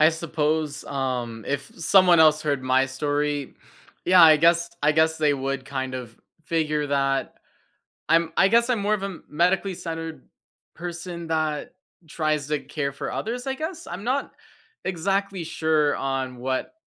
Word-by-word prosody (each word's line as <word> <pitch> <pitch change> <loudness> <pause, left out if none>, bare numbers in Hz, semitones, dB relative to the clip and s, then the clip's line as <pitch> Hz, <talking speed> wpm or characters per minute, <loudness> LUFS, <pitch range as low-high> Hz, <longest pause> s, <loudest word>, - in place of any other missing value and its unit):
I 155 +1 +7
suppose, 155 -2 -2
um, 125 -5 -3
if 140 0 -2
someone 180 0 +5
else 155 -1 +5
heard 145 -3 -1
my 130 +1 +3
story, 145 +1 -2 0.5
yeah, 180 0 +7
I 160 -1 +9
guess 170 +2 +3
I 150 +1 +4
guess 160 +1 +2
they 150 -2 +3
would 135 -1 -3
kind 130 -1 -4
of 120 -3 -7 0.3
figure 155 -2 0
that. 135 -1 0 0.7
I'm 165 0 +3
I 195 - +6
guess 235 +3 +3
I'm 245 -3 +1
more 205 +1 +1
of 205 -2 -1
a 195 -3 -5
medically 180 +5 +1
centered 165 -4 -6 0.5
person 175 0 -6
that 155 -2 -2 0.3
tries 155 -2 -1
to 150 0 0
care 140 -1 -3
for 140 - -5
others, 245 +4 -4
I 265 - -1
guess? 320 +4 -6
I'm 180 +3 -6
not 260 +4 -1 0.5
exactly 195 +1 -1
sure 155 -2 +1
on 135 -2 -3
what 130 - -3
155 Hz, 155 wpm, -24 LUFS, 140-175 Hz, 0.7 s, I